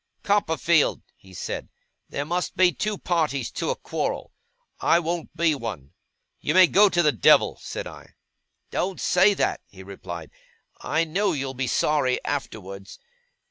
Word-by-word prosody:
'Copperfield,' 170 -5 +2
he 95 - -19
said, 90 - -5 0.4
'there 140 - -3
must 175 +3 -2
be 185 -1 +5
two 210 +3 -2
parties 155 -9 -1
to - - -3
a - - 0
quarrel. - - -4 0.5
I 165 - +4
won't 170 0 -3
be 165 -2 +3
one.' 105 - -6 0.5
'You - - -1
may 185 0 +9
go 200 +4 +5
to 175 -2 +2
the 150 - +4
devil!' 110 -10 +4
said - - -5
I. - - -12 0.6
'Don't 185 0 -2
say 190 +3 +4
that!' - - 0
he 95 -1 -13
replied. 90 -4 -8 0.5
'I 160 - +1
know 185 +4 0
you'll 135 -2 -3
be 130 0 -2
sorry 130 0 +1
afterwards. 100 -8 -5
155 Hz, 150 wpm, -24 LUFS, 115-180 Hz, 0.6 s, may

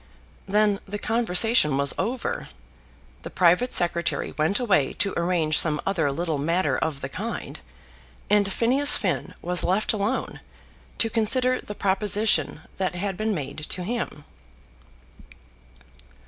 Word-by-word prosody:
Then 205 0 +2
the 205 +2 -4
conversation 225 - +2
was 140 0 +3
over, 255 - -3 0.7
the - - -7
private 180 +8 +3
secretary 170 -1 0
went 160 +6 +1
away 195 - +1
to 200 -1 -1
arrange 170 -3 +1
some 150 -2 +4
other 165 -7 0
little 160 0 -2
matter 170 +6 0
of 150 -4 -2
the - - -3
kind, - - -6 0.7
and 205 -1 +2
Phineas 260 +7 +4
Finn - - -2
was 180 0 -1
left 200 +5 +1
alone 210 0 -2 0.6
to 225 - +1
consider 250 +3 +1
the 210 - -8
proposition 200 -5 +1 0.2
that 185 -2 -2
had 195 +1 -3
been 215 +1 -1
made 150 -1 -5
to 180 - -3
him. 215 -8 -4
195 Hz, 130 wpm, -24 LUFS, 170-220 Hz, 0.7 s, some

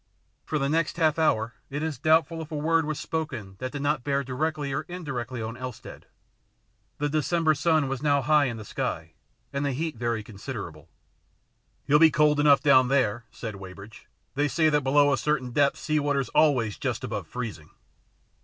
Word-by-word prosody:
For 155 - -1
the 140 -2 0
next 160 +2 0
half 160 -2 +2
hour 115 -7 +1 0.2
it 145 +2 -3
is 155 -6 -3
doubtful 160 +2 +2
if 160 - -9
a - - -3
word 160 +2 +1
was 155 -1 -3
spoken 130 -12 -4
that 130 0 -4
did 145 -1 -5
not 145 -3 0
bear 140 0 0
directly 145 +2 -2
or 150 - -1
indirectly 130 -9 -5
on 110 +1 -5
Elstead. 125 -2 -9 0.9
The 145 - 0
December 155 +2 +1
sun 155 0 +2
was 135 -1 -3
now 145 -2 +2
high 150 +1 +4
in 120 -3 -3
the 110 - -8
sky, 80 -4 -4 0.4
and 140 +1 -1
the 140 -1 0
heat 155 0 -3
very 115 -2 -2
considerable. 100 - -8 0.5
" - - -44
He'll 145 +1 +4
be 165 0 +8
cold 150 0 +3
enough 140 -2 +5
down 135 -3 +6
there," 120 -4 +1
said 110 -4 -7
Wey 95 -1 -9
bridge. 100 +4 -13
" - - -45
They 145 +2 +1
say 155 +2 +2
that 150 -1 +2
below 145 +1 +4
a 135 - 0
certain 140 -5 -1
depth 140 +3 +2
sea 155 -1 0
water's 140 -3 0
always 125 -9 +2
just - - -2
about - - -4
freezing." 110 -11 -6
140 Hz, 195 wpm, -26 LUFS, 120-155 Hz, 0.9 s, be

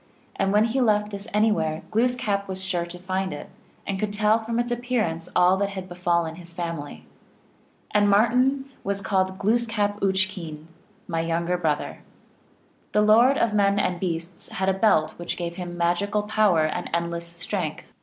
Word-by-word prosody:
and 195 - +1
when 210 +1 +4
he 235 +4 +1
left 210 -3 +2
this 200 +1 -7
anywhere 170 -7 +1
Gloos 245 +3 +2
kap 200 -5 -1
was 190 0 -4
sure 175 -2 -1
to 175 +1 -8
find 185 +1 -2
it, 145 - -8 0.3
and 195 -1 -2
could 210 0 -1
tell 210 +2 +3
from 230 +1 -3
its 240 0 0
ap 240 - -1
pearance 215 -10 -1
all 180 +1 +5
that 200 0 0
had 190 -2 -6
befallen 170 -2 -1
his 170 -1 -12
family. 165 - -5 0.9
And 205 0 +3
Martin 250 +6 +3 0.2
was 200 0 -2
called 190 -1 +1
by 190 - -9
Glooskap 210 0 0
Uch 190 -1 +2
keen 170 -5 -7
(M.), 155 +1 -15 0.4
"my 165 -2 -1
younger 170 +2 0
brother." 155 -4 -1 0.9
The 210 - +4
Lord 235 +6 +6
of 230 -2 +1
men 200 -1 +3
and 180 -3 0
beasts 170 -1 -4
had 190 +1 0
a - - +3
belt 190 -6 +3
which 175 - -4
gave 170 0 -4
him 175 -1 -6
magical 200 +5 +1
power 210 -6 +3
and 175 +3 -3
endless 170 0 -2
strength. 170 -1 -3
190 Hz, 185 wpm, -25 LUFS, 170-210 Hz, 0.9 s, Lord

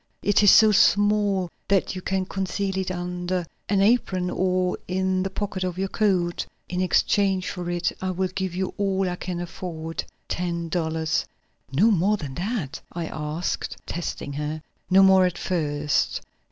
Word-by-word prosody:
"It 205 0 +4
is 205 - +7
so 220 +1 +8
small 205 -3 +3 0.2
that 195 -2 +2
you 185 - -5
can 190 0 -1
conceal 195 +1 -2
it 190 - -2
under 180 0 -2 0.2
an 200 -1 +3
apron 195 -5 +2
or 185 0 0
in 185 0 0
the 190 - -1
pocket 195 -1 -3
of 180 -1 -3
your 195 0 -1
coat. 185 -6 +1 0.2
In 180 0 -2
exchange 190 +1 +2
for 175 -2 -5
it, 175 0 0
I 190 - -1
will 185 0 -1
give 185 -1 -3
you 190 0 -2
all 195 -1 +1
I 180 - -2
can 180 -1 -4
afford 165 -2 -5 0.2
ten 170 -1 -2
dollars." 160 -1 0 0.5
"No 195 +12 +4
more 200 +2 +3
than 145 -7 -6
that?" 180 - -3
I 170 -1 -4
asked, 155 +2 -3
testing 165 -4 -4
her. 150 +2 -4 0.3
"No 190 +1 +7
more 190 -1 +7
at 175 -1 -4
first. 150 -5 0
185 Hz, 165 wpm, -25 LUFS, 175-195 Hz, 0.5 s, so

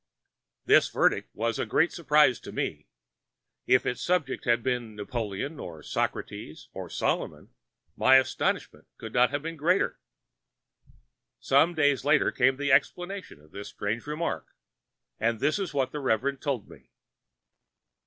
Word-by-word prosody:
This - - +5
verdict - - +1
was 115 +1 -1
a - - 0
great 160 +4 +2
surprise 150 -7 +3
to - - -10
me. - - -4 0.8
If 130 0 +4
its 125 - -2
subject 175 -7 -1
had 120 -1 +2
been 125 -4 -2
Napoleon, 110 +6 -4
or 80 -3 -8
Socrates, - - -4
or - - -7
Solomon, - - -2 0.4
my 130 - +5
astonishment 130 0 0
could - - -9
not 125 0 +4
have 145 0 -3
been 165 0 -5
greater. 175 +6 +1 1.4
Some 170 +1 +3
days 145 -3 +2
later 145 +2 +3
came 130 +1 +2
the 145 0 0
explanation 180 - 0
of 75 0 -22
this 100 +1 -8
strange 105 +6 -4
remark, 150 - -3 0.7
and 115 0 0
this 155 - +1
is 195 - -3
what 135 -3 -1
the 150 - -4
Reverend 135 +1 0
told 135 -7 -2
me. - - -16
130 Hz, 145 wpm, -27 LUFS, 115-150 Hz, 1.4 s, This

